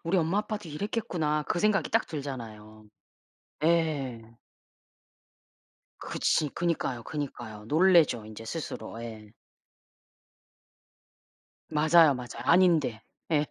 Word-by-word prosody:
'우리 175 +3 +1
엄마 170 +5 +1
아빠도 210 -4 -4
이랬겠구나.' 155 -4 -2
그 - - 0
생각이 205 +1 +2
딱 225 0 +2
들잖아요. 110 -7 -7 0.8
네. 155 -7 +1 1.8
그렇지. 150 - 0
그니까요, 145 -9 -2
그니까요. 120 -7 -6
놀래죠 160 - +4
인제 110 +1 -10
스스로. 115 -4 -6
예. 110 -2 -9 2.4
맞아요, 155 0 +5
맞아요. 125 -1 -7
아닌데. 165 -10 +3 0.3
예. 150 -2 +2
150 Hz, 230 characters per minute, -28 LUFS, 115-170 Hz, 2.4 s, 맞아요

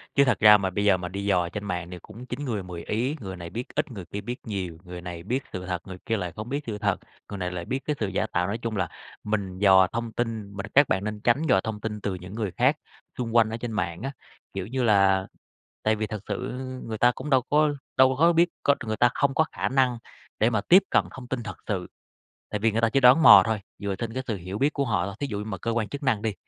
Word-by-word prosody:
Chứ 140 - +6
thật 125 -5 +2
ra 105 -1 +9
mà 95 -1 -1
bây 100 +3 -1
giờ 100 -2 +5
mà 90 -1 -5
đi 100 +1 -5
dò 90 -4 +2
trên 105 +2 -5
mạng 90 -2 -3
thì 90 - -6
cũng 120 +3 -11
chín 130 +3 -5
người 110 -6 -2
mười 85 -2 -7
ý, 125 +8 -1
người 95 -5 -6
này 85 -1 -7
biết 120 +6 -5
ít 150 -2 -1
người 95 -7 -7
kia 100 +5 -6
biết 120 +4 -4
nhiều, 95 -7 -4
người 90 -1 -8
này 85 -1 -7
biết 125 +7 -2
sự 90 0 -5
thật, 90 -1 -3
người 95 - -7
kia 115 -1 0
lại 90 -3 -3
không 110 +3 -6
biết 145 +2 -2
sự 105 -2 -3
thật, 105 -1 0 0.3
người 100 - -5
này 90 -1 -3
lại 85 -1 -5
biết 135 - -2
cái 150 - 0
sự 105 - 0
giả 95 +3 -1
tạo, 90 0 0
nói 105 +3 -2
chung 115 -1 -4
là 95 -3 0 0.4
mình 100 -3 -2
dò 95 -2 +6
thông 115 0 -3
tin 110 -3 -3
mình 100 +1 -4
các 140 0 +6
bạn 95 - +1
nên 105 0 -4
tránh 120 +5 +3
dò 95 -7 +5
thông 110 -2 -4
tin 105 -2 -4
từ 100 - -2
những 90 +3 -9
người 105 -5 -2
khác 135 +5 +3 0.4
xung 120 -2 -3
quanh 110 -2 +5
ở 115 - -4
trên 120 -1 -5
mạng 90 -3 -2
á. 135 +1 -3 0.4
Kiểu 95 0 -4
như 130 +1 -1
là 95 -3 +4 0.6
tại 110 0 +2
vì 110 0 -2
thật 110 -3 -5
sự 125 +1 -3 0.3
người 110 -2 -5
ta 125 0 +5
cũng 150 - -6
đâu 130 -2 +4
có 150 0 +4 0.3
đâu 130 0 +5
có 165 +5 +4
biết 170 +1 +4
có 140 - +4
người 110 0 -2
ta 120 +2 +4
không 140 -1 +1
có 160 - +4
khả - - -1
năng 130 -3 +2 0.4
để 110 - +3
mà 110 -3 +1
tiếp 185 - +6
cận - - +4
thông 130 -2 -10
tin 125 -2 -3
thật 105 -4 -7
sự, 95 -4 -2 0.6
tại 105 - -1
vì 115 0 +2
người 115 - +1
ta 115 - +3
chỉ 135 - +2
đoán 130 +5 +7
mò - - +10
thôi, 110 -2 -1 0.2
dựa 100 -1 -3
trên 115 -1 -4
cái 130 - -2
sự 110 -4 -2
hiểu 95 +3 -6
biết 145 +2 +2
của 140 - 0
họ 95 -7 0
thôi. 100 - -6
Thí 140 - -1
dụ 105 -6 -4
như 105 - -4
mà 105 -4 -5
cơ 115 - -3
quan 115 -2 -1
chức 140 0 -6
năng 115 -6 +1
đi, 110 -3 -1
110 Hz, 285 wpm, -26 LUFS, 95-125 Hz, 0.6 s, mò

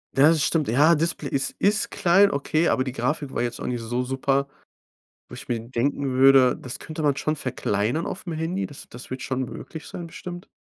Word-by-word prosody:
Ja, 145 +3 +7
das 160 -3 +3
stimmt. 155 -4 +1
Ja, 145 +9 +5
Display 160 -2 -1
ist 135 - -1
ist 210 +2 +2
klein, 200 +1 +4
okay, 155 +4 0
aber 130 - +2
die 130 - -4
Grafik 140 +3 -2
war - - -1
jetzt 120 -1 -3
auch - - -5
nicht 120 -2 -2
so 120 +2 -2
super, 135 +2 0 0.8
wo - - -15
ich - - -9
mir 120 -2 -1
denken 130 +4 -1
würde, 130 0 +6
das 125 - -7
könnte 155 0 -7
man 145 -2 +2
schon 155 +1 -1
verkleinern 125 +1 -1
aufm 180 -3 -5
Handy. 165 +5 -2
Das 145 - -11
das 125 +1 -11
wird 130 0 -5
schon 130 -1 -2
möglich 160 +6 -9
sein, 175 - -7
bestimmt. 175 +2 -8
140 Hz, 210 wpm, -24 LUFS, 130-160 Hz, 0.8 s, Ja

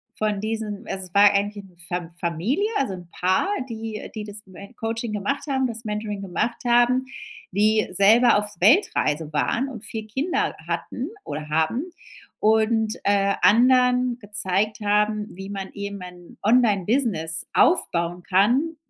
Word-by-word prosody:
von 210 -2 -1
diesen 220 -2 -4
also, 190 -1 -3
es 175 - -25
war 200 0 +7
eigentlich 205 0 -1
'ne 180 -2 -20
Fa 175 -2 -3
Familie, 185 - -1
also 220 -8 -1
'n 175 -2 -9
Paar, 185 - +1 0.2
die 220 -1 -6
die 215 - -4
das 205 0 -7
Me 200 +5 -12
Coaching 225 0 -3
gemacht 210 +9 -2
haben 265 -2 +1
das 230 0 -6
Mentoring 210 -1 -4
gemacht 200 +7 -3
haben, 245 +2 +3 0.5
die 215 +2 +2
selber 220 +3 +5
auf 210 0 -1
Weltreise 165 - +3
waren 230 - 0
und 230 -4 -9
4 220 -2 -5
Kinder 285 - -1
hatten 260 +7 -4 0.2
oder 150 +1 -6
haben. 160 - 0 0.5
Und, 220 0 +2
äh, 200 0 +2
anderen 250 +4 +4
gezeigt 205 0 -1
haben 210 +1 +1
wie 195 +2 -9
man 195 -1 -6
eben 200 -1 -6
ein 180 -1 -12
Online-Business 210 - +2
aufbauen 175 - +2
kann, 245 - +2
210 Hz, 145 wpm, -23 LUFS, 195-235 Hz, 0.5 s, war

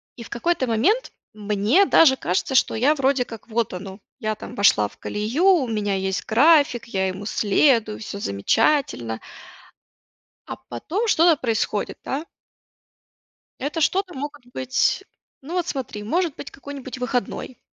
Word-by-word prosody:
И 235 - -9
в - - -13
какой-то 260 +1 -1
момент 335 - +1 0.2
мне 210 - +2
даже 265 -8 +5
кажется, 185 +9 -1
что 250 - +3
я 260 +7 +3
вроде 270 -2 +2
как: 225 -3 -11
"Вот 225 -3 -1
оно". 190 +2 -8 0.2
Я 215 -3 -2
там - - -10
вошла 110 - +4
в - - -20
колею, 225 - -2
у 345 -10 +5
меня 205 -3 -1
есть 190 -1 -2
график, 285 +1 +4
я 190 -4 -1
ему 190 +2 -5
следую, 215 +1 +2
всё 205 -2 -7
замечательно. 120 - 0 1.3
А - - -5
потом 360 - -3
что-то 330 -5 +4
происходит, 220 -3 -1
да. 295 +5 -3 1.3
Это 295 +5 -3
что-то 370 +4 +1
могут 290 -1 -7
быть 260 +10 0 0.4
ну 325 +6 -7
вот 355 -2 0
смотри, 255 - -5
может 330 - 0
быть - - -8
какой-нибудь 275 -3 -8
выходной, 250 0 -3
245 Hz, 145 wpm, -23 LUFS, 210-295 Hz, 1.3 s, даже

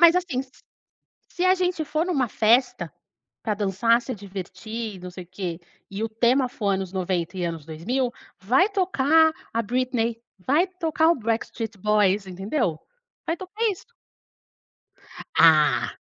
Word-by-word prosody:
Mas 340 0 +8
assim, 340 -8 -1
s 265 - -9 0.8
se 355 - -3
a 370 0 +6
gente 360 -3 0
for 310 +2 -1
numa 275 -10 0
festa 215 - +2 0.5
pra 215 - 0
dançar, 210 +4 +2
se 255 - -5
divertir 200 +3 -6
e - - -11
não 180 0 -8
sei 180 0 -8
o - - -23
quê, 180 -2 -5 0.3
e 195 +2 -5
o - - 0
tema 245 +4 +2
for 210 -4 -2
anos 190 -1 -1
90 185 -1 -2
e 180 - -2
anos 165 -3 -4
2000, 235 +12 -2 0.3
vai 255 - +3
tocar 320 -5 +3 0.2
a 230 - +1
Britney, 235 0 -1 0.2
vai 290 - +2
tocar 320 -1 +2
o 340 - +4
Backstreet 225 -1 -3
Boys, 205 0 +2
entendeu. 190 - -2 0.5
Vai 330 - +1
tocar 380 +5 -5
isso. 385 - -6 1.5
Ah. 155 -2 +5
225 Hz, 155 wpm, -24 LUFS, 190-285 Hz, 1.5 s, Mas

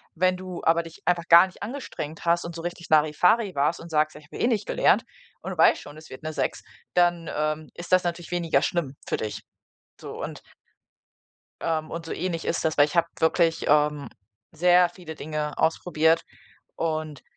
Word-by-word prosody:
Wenn 185 +2 +2
du 185 -1 -7
aber 165 +1 +4
dich 165 0 -13
einfach 175 -1 +1
gar 170 +2 +9
nicht 185 - -17
angestrengt 205 - -6
hast 170 0 +2
und 170 -1 -7
so 165 - -7
richtig 175 0 -6
Larifari 180 +7 +3
warst 145 +4 +1
und 165 - -11
sagst: 155 0 +1
„Ich 150 - -15
habe, 155 - -11
ja, - - -5
eh - - +4
nicht 225 -5 0
gelernt" - - +3 0.4
und - - -5
du - - -7
weißt - - +5
schon, 145 +1 -12
es 155 - -13
wird 130 - -11
'ne 155 0 -4
6, - - -2 0.3
dann, 175 -2 +2
ähm, 155 +1 -2
ist 175 - -9
das 185 0 +5
natürlich 175 0 -4
weniger 170 -2 +1
schlimm 150 -6 -1
für - - -1
dich. 105 -1 -5 0.6
So - - -7
und - - -6 1.2
ähm, 160 -1 -1
und 165 0 -6
so - - -5
ähnlich 170 -2 -3
ist - - -1
das, 160 -1 0
weil 145 - +7
ich 150 - -7
habe 170 0 +4
wirklich, 165 0 +2
ähm, 150 -1 +2 0.4
sehr 175 +2 +4
viele 170 -2 -10
Dinge 150 0 -4
ausprobiert 160 0 +2 0.5
und 155 -3 -3
165 Hz, 195 wpm, -25 LUFS, 155-175 Hz, 1.2 s, gar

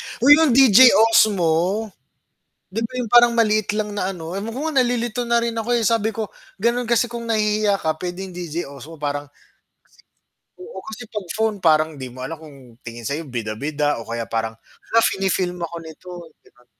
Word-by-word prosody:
Mm. - - -9
Uy, 285 - +7
'yon 320 -2 +4
DJI 260 -6 +7 0.3
Osmo. 215 -7 +3 1.2
'Di 225 - -1
ba 225 - -4
'yong 245 -4 -4
parang 240 0 +7
maliit 215 -2 +2
lang 210 -1 -2
na 190 -2 -1
ano, 170 -2 -8
ewan 210 +3 -4
ko 260 - -5
nga 300 -4 -2
nalilito 240 -1 -1
na 235 0 +1
rin 235 0 -2
ako, 225 +1 -4
eh, 225 - 0
sabi 225 -1 +1
ko, 220 -1 -4 0.3
gano'n 235 +3 +1
kasi 235 0 +3
kung 235 0 -7
nahihiya 210 -2 +1
ka 155 -1 -1
pwedeng 180 +1 -5
DJI 170 -2 -5
Osmo 140 +3 -11
parang 145 0 -3
sige, - - -29 1.1
oo, 450 +7 -9
kasi 220 +2 -8
'pag 210 -4 -6
phone 220 -1 0
parang 155 -1 +3
'di 130 -2 -7
mo 130 - -11
alam 165 - -6
kung 155 -3 -14 0.3
tingin 115 -1 -8
sa 140 - -2
'yo 165 - -6
bida-bida 140 +4 -2
o - - -12
kaya 115 0 -5
parang, 110 0 -2 0.4
"Hala, 230 - +5
fini-film 185 -2 -1
ako 170 0 -6
nito," 160 +3 -12 0.3
'di - - -23
ba? 125 0 -27
195 Hz, 195 wpm, -21 LUFS, 155-230 Hz, 1.2 s, Uy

